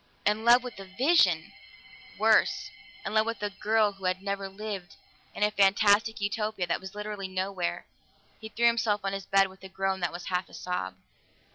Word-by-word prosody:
In 210 +1 +1
love 240 +1 +6
with 245 -5 -8
a 195 - -8
vision! 220 - +3 0.6
Worse - - +3 0.3
in - - -3
love 215 0 +3
with 230 -2 -4
a 205 - -1
girl 210 +1 +2
who 195 -1 -11
had 185 0 +1
never 200 -1 -3
lived, 195 -2 -7 0.4
in - - -1
a 210 - +3
fantastic 205 +2 +3
Utopia 210 -1 -1
that 175 - -2
was 190 +1 -9
literally 210 -2 -5
nowhere! 185 -1 -3 0.5
He 220 - -8
threw 235 +2 0
himself 225 -3 +2
on 195 0 -2
his 195 0 -5
bed 195 0 +4
with 190 0 -17
a 190 - -9
groan 190 0 -1
that 175 -2 -1
was 175 0 -8
half 180 0 -1
a - - -12
sob. 95 - -4
200 Hz, 190 wpm, -28 LUFS, 190-215 Hz, 0.6 s, love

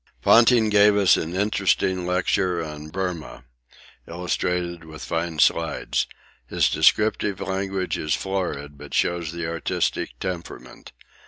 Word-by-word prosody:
Ponting 115 -1 +5
gave 105 0 +5
us 95 -6 +5
an 85 +2 -3
interesting 95 -2 +1
lecture 90 -1 0
on 75 0 -8
Burmah, 90 -6 -5 0.6
illustrated 90 0 -2
with 80 -1 -10
fine 80 -1 -3
slides. 80 +2 +1 0.4
His - - +1
descriptive 105 -2 +2
language 95 -1 -2
is 75 -2 0
florid, 75 -7 -4
but 75 -1 -8
shows 85 -3 0
the 85 0 -5
artistic 80 -6 -2
temperament. 85 -9 -7
90 Hz, 115 wpm, -23 LUFS, 80-95 Hz, 0.6 s, Ponting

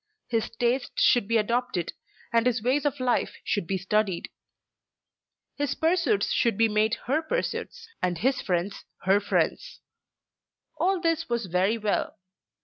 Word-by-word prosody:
His 225 -2 0
tastes 240 +3 0
should 240 -5 +4
be 230 +1 +3
adopted, 225 -5 -1 0.4
and 230 +1 +4
his 240 -3 0
ways 270 +5 +1
of 285 -1 -3
life 250 -1 0
should 205 -5 -1
be 195 - 0
studied. 195 -1 0 1.3
His 290 -2 -1
pursuits 350 +5 +1
should 235 -6 +2
be 225 - +4
made 215 +1 +2
her 285 +6 +1
pursuits, 475 +4 -3
and 180 -1 0
his 255 +9 +1
friends 185 +2 -2 0.2
her 195 +2 +4
friends. - - -1 1.0
All 380 0 +2
this 330 -3 0
was 235 -2 -1
very 185 +5 +1
well. 215 -1 -1
230 Hz, 140 wpm, -27 LUFS, 205-280 Hz, 1.3 s, should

